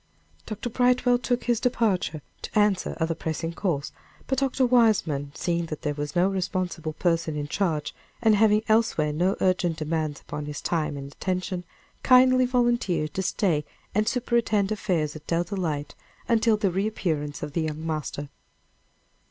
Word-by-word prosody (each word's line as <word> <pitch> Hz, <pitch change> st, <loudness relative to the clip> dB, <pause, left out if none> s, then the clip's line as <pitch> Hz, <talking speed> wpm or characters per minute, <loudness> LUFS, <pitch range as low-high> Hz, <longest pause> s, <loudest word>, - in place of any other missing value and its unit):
Dr. 220 Hz, +2 st, -4 dB
Brightwell 245 Hz, 0 st, +3 dB
took 245 Hz, 0 st, -1 dB
his 240 Hz, -2 st, +1 dB
departure, 210 Hz, -, 0 dB, 0.2 s
to -, -, -4 dB
answer 205 Hz, -3 st, +2 dB
other 165 Hz, 0 st, +1 dB
pressing 165 Hz, +1 st, -3 dB
calls. 165 Hz, -6 st, -2 dB, 0.3 s
But 265 Hz, -2 st, 0 dB
Dr. 270 Hz, -1 st, +1 dB
Weismann, 210 Hz, -, +2 dB
seeing 170 Hz, -1 st, -1 dB
that 155 Hz, 0 st, -6 dB
there 150 Hz, -2 st, 0 dB
was 145 Hz, +3 st, -5 dB
no 175 Hz, +2 st, +4 dB
responsible 180 Hz, -4 st, -2 dB
person 165 Hz, -1 st, 0 dB
in 145 Hz, -1 st, -3 dB
charge, 160 Hz, -3 st, -1 dB, 0.3 s
and 220 Hz, -2 st, +4 dB
having 210 Hz, 0 st, +4 dB
elsewhere 215 Hz, -9 st, +2 dB
no 180 Hz, +5 st, +1 dB
urgent 180 Hz, -3 st, +1 dB
demands 155 Hz, -2 st, -2 dB
upon 150 Hz, 0 st, -6 dB
his 150 Hz, -1 st, -5 dB
time 155 Hz, -4 st, -1 dB
and 140 Hz, 0 st, -7 dB
attention, 185 Hz, +2 st, -3 dB, 0.4 s
kindly 255 Hz, 0 st, +6 dB
volunteered 240 Hz, -, +1 dB
to 190 Hz, -, -1 dB
stay 180 Hz, -5 st, +1 dB, 0.3 s
and 215 Hz, +2 st, +1 dB
superintend 230 Hz, -5 st, +1 dB
affairs 175 Hz, -8 st, -1 dB
at 155 Hz, -, -11 dB
Dell 170 Hz, +1 st, +1 dB
Delight, 165 Hz, -6 st, -3 dB, 0.3 s
until 225 Hz, -1 st, +3 dB
the 200 Hz, -3 st, +1 dB
reappearance 170 Hz, -7 st, -2 dB
of 145 Hz, -, -5 dB
the 165 Hz, -, 0 dB
young 155 Hz, 0 st, -3 dB
master. 150 Hz, -2 st, -3 dB
180 Hz, 155 wpm, -26 LUFS, 155-220 Hz, 0.4 s, kindly